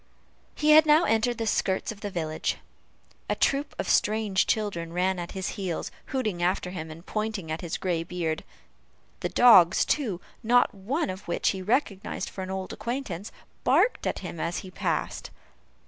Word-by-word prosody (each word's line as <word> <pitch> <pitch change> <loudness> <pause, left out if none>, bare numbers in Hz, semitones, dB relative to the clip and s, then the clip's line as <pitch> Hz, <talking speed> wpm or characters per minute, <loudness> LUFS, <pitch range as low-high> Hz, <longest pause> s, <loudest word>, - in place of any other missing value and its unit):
He 305 0 +3
had 310 +1 +8
now 305 +3 +6
entered 230 -1 +1
the 225 - -2
skirts 190 -2 0
of 205 -2 -11
the 205 - -3
village. 160 -4 -2 0.7
A - - +1
troop 280 +1 0
of - - -3
strange 210 -3 +2
children 195 -7 -1
ran 185 +1 +1
at 175 - -6
his 190 -1 -3
heels, 190 -5 -4 0.2
hooting 215 -10 -2
after 180 0 0
him, 160 -3 -6
and 165 +3 -11
pointing 215 -6 -3
at 160 - -3
his 170 -2 -3
gray 175 -3 -1
beard. 165 -2 -3 0.8
The - - -2
dogs, 195 -9 +7
too, 225 - 0 0.2
not 245 +1 +4
one 210 - -2
of 185 +2 -9
which 175 - +1
he 190 - -2
recognized 205 -1 -1
for 190 - -6
an 185 - -5
old 190 0 -4
acquaintance, 235 -6 -4 0.3
barked - - +3
at - - -1
him 170 -1 -6
as 170 +2 -2
he 185 - -10
passed. - - -2
190 Hz, 175 wpm, -27 LUFS, 175-225 Hz, 0.8 s, had